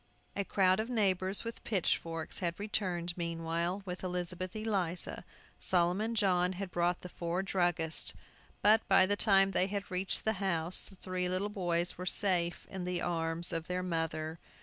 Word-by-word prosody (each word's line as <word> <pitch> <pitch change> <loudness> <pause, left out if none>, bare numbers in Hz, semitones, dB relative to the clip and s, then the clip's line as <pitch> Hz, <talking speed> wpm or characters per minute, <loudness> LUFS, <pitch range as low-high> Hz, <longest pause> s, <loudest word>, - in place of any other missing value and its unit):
A 200 - 0
crowd 190 -1 +3
of 220 +2 -2
neighbors, 195 -4 +2
with 230 0 -6
pitchforks, 165 -5 -1
had 170 -2 -2
returned 180 -5 -1
meanwhile 170 +2 -2
with 180 0 -6
Elizabeth 180 +1 -3
Eliza. 195 -6 -1 0.4
Solomon 185 +6 +1
John 180 -3 +3
had 190 0 -5
brought 175 +1 0
four 175 +2 -2
druggists. 175 -4 0 0.5
But, 215 +2 +6
by 190 -1 +6
the 205 +2 +1
time 195 -2 +4
they 185 - +2
had 200 0 -4
reached 185 +1 0
the 220 - +2
house, 175 -2 +2
the 195 - -13
three 185 -1 -2
little 185 +3 0
boys 175 -4 -1
were 180 - -4
safe 175 -3 +1
in 190 -2 -4
the 180 -1 -1
arms 165 0 +1
of 165 0 -2
their 180 0 -2
mother! 165 -2 -2
180 Hz, 160 wpm, -32 LUFS, 170-195 Hz, 0.5 s, But